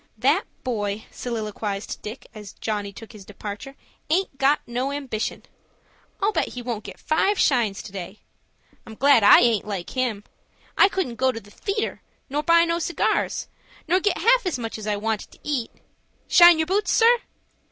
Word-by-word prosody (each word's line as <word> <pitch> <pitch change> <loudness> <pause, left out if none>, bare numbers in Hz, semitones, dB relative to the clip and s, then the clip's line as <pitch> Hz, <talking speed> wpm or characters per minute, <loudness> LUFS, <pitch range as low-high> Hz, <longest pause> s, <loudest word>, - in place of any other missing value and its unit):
"That - - +2 0.2
boy," 210 -4 -3
soliloquized 215 -3 -4
Dick, 215 +5 -8
as 210 -3 -10
Johnny 205 -2 -3
took 225 +3 -12
his 210 -4 -12
departure, 205 +6 -8 0.3
"aint 355 -2 0
got 275 +2 +4
no 250 +3 -2
ambition. 270 -6 -4 0.8
I'll 405 +2 +2
bet - - 0
he 245 - -6
won't 235 -3 -4
get - - -10
five 385 +6 +1
shines 235 - +1
to - - -10
day. 190 +1 -8 0.7
I'm 220 - -9
glad 275 0 +5
I 205 - +8
aint 230 -4 +2
like 195 -4 -4
him. 245 -6 -2 0.5
I 395 - +6
couldn't 350 -13 -3
go 260 0 +2
to 225 - -6
the 205 -1 -18
theatre, 410 - -3 0.3
nor 290 +2 0
buy 335 +2 +5
no 335 0 0
cigars, 345 +1 -1 0.4
nor 360 +3 +3
get 410 +1 0
half - - +4
as 345 - -1
much 225 -2 -5
as 215 - -7
I 210 - +1
wanted 215 +1 -3
to - - -19
eat.—Shine 300 +5 +2
yer 315 - +1
boots, 400 +5 0
sir?" 470 +1 +5
240 Hz, 175 wpm, -24 LUFS, 210-320 Hz, 0.8 s, I